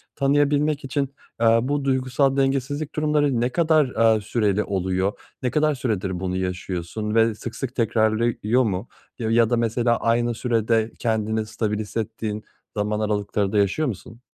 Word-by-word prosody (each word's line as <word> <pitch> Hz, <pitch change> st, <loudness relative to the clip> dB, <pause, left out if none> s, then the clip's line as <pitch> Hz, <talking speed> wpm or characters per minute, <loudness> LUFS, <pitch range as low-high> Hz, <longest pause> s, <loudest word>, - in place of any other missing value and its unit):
tanıyabilmek 145 Hz, +1 st, +2 dB
için, 140 Hz, 0 st, -2 dB, 0.3 s
eee, 115 Hz, 0 st, +5 dB
bu 140 Hz, +2 st, -1 dB
duygusal 130 Hz, +1 st, +1 dB
dengesizlik 135 Hz, +2 st, -1 dB
durumları 150 Hz, -5 st, +1 dB
ne 120 Hz, -, +1 dB
kadar, 135 Hz, -9 st, +3 dB
eee, 105 Hz, -, -2 dB
süreli 105 Hz, -2 st, 0 dB
oluyor? 95 Hz, 0 st, -1 dB, 0.3 s
Ne 125 Hz, -, 0 dB
kadar 155 Hz, -1 st, +2 dB
süredir 100 Hz, -8 st, -2 dB
bunu 95 Hz, -1 st, -2 dB
yaşıyorsun 95 Hz, +3 st, -3 dB
ve 115 Hz, -1 st, +3 dB
sık 115 Hz, +2 st, -7 dB
sık 130 Hz, -2 st, -5 dB
tekrarlıyor 115 Hz, +1 st, +1 dB
mu 100 Hz, +1 st, -2 dB, 0.3 s
ya 110 Hz, -1 st, -1 dB
ya 115 Hz, 0 st, +4 dB
da 120 Hz, -, +2 dB
mesela 115 Hz, 0 st, +1 dB
aynı 120 Hz, +1 st, +1 dB
sürede 115 Hz, -1 st, 0 dB
kendini 110 Hz, -1 st, 0 dB
stabilize 110 Hz, 0 st, -3 dB
hissettiğin 110 Hz, 0 st, -4 dB, 0.3 s
zaman 105 Hz, +1 st, 0 dB
aralıkları 105 Hz, -1 st, -1 dB
da 105 Hz, -, 0 dB
yaşıyor 100 Hz, +10 st, +2 dB
musun? 115 Hz, +2 st, -7 dB
115 Hz, 150 wpm, -23 LUFS, 105-130 Hz, 0.3 s, eee